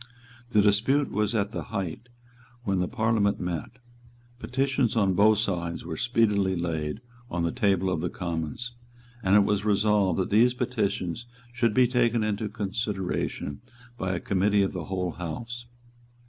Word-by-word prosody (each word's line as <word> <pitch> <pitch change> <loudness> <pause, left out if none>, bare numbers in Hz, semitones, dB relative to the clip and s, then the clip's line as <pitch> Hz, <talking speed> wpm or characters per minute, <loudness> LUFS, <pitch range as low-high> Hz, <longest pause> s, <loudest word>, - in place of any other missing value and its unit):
The 105 -3 +4
dispute 115 +8 +3
was 105 +2 0
at 100 -1 0
the - - -4
height 100 +2 -4 0.5
when 100 -4 0
the 90 - +1
Parliament 110 -3 +1
met. 90 +1 -4 0.7
Petitions 130 -2 0
on 100 -4 +3
both 105 +3 +5
sides 85 -6 -2
were 80 -1 -4
speedily 105 -5 +2
laid 80 +1 -2 0.3
on 85 -1 -1
the 85 - +1
table 100 -6 +1
of 90 -3 0
the 90 - -1
Commons; 85 +8 -4 0.5
and 95 -2 +3
it 105 - +7
was 105 0 0
resolved 105 -3 +2
that 95 - -1
these 120 +4 +5
petitions 110 -4 -2 0.3
should 120 -3 +1
be 130 - +6
taken 120 -2 +2
into 105 0 -1
consideration 100 -7 -3 0.3
by 95 -5 -2
a - - -2
Committee 100 +2 +2
of 95 - -1
the 90 -3 -4
whole 90 -2 -2
House. 115 +9 -6
100 Hz, 155 wpm, -27 LUFS, 90-115 Hz, 0.7 s, it